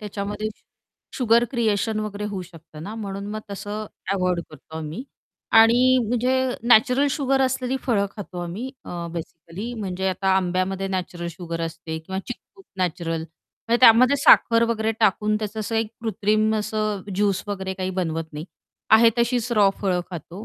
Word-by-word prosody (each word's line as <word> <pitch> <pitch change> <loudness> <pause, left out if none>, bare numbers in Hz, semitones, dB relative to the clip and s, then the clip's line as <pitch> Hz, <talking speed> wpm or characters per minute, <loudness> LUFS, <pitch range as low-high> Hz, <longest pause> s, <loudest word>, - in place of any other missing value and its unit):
त्याच्यामध्ये 205 +1 -4 0.7
sugar 235 -2 +4
creation 220 -2 0
वगैरे 210 -1 -4
होऊ 200 -3 -4
शकतं 160 -3 -13
ना 210 +5 -6
म्हणून 200 -2 -5
मग 215 +1 -4
तसं 205 +2 -5 0.3
अव्हॉइड 180 -2 0
करतो 160 +1 -12
आम्ही 160 +8 -5 0.6
आणि 250 +3 +5
म्हणजे 245 +2 +1 0.4
नॅचरल 250 +5 +5
शुगर 270 -1 +1
असलेली 260 0 0
फळं 205 -5 +1
खातो 190 -3 -7
आम्ही 205 +10 -5
अ, 170 -1 -5
बेसिकली 170 +6 -7
म्हणजे 190 -1 -2
आता 190 +1 -1
आंब्यामध्ये 185 +1 -1
नॅचरल 180 -2 -4
शुगर 170 0 -6
असते 165 -1 -5
किंवा 190 +4 -5
चिक्कूत 375 +10 -10
नॅचरल 165 -2 -1 0.5
म्हणजे 235 +1 +2
त्यामध्ये 255 +3 +7
साखर 230 -4 +6
वगैरे 220 -1 0
टाकून 210 0 +2
त्याचं 215 0 -4
असं 225 +2 -3
1 225 -1 0
कृत्रिम 215 0 +1
असं 215 -2 -2
ज्यूस 200 -1 +1
वगैरे 190 -1 -3
काही 185 0 -3
बनवत 165 -3 -2
नाही. 150 +1 -6 0.5
आहे 225 +1 +7
तशीच 240 0 +1
रॉ 210 -3 +5
फळं 185 -3 +1
खातो 175 +4 -8
205 Hz, 155 wpm, -23 LUFS, 185-225 Hz, 0.7 s, त्यामध्ये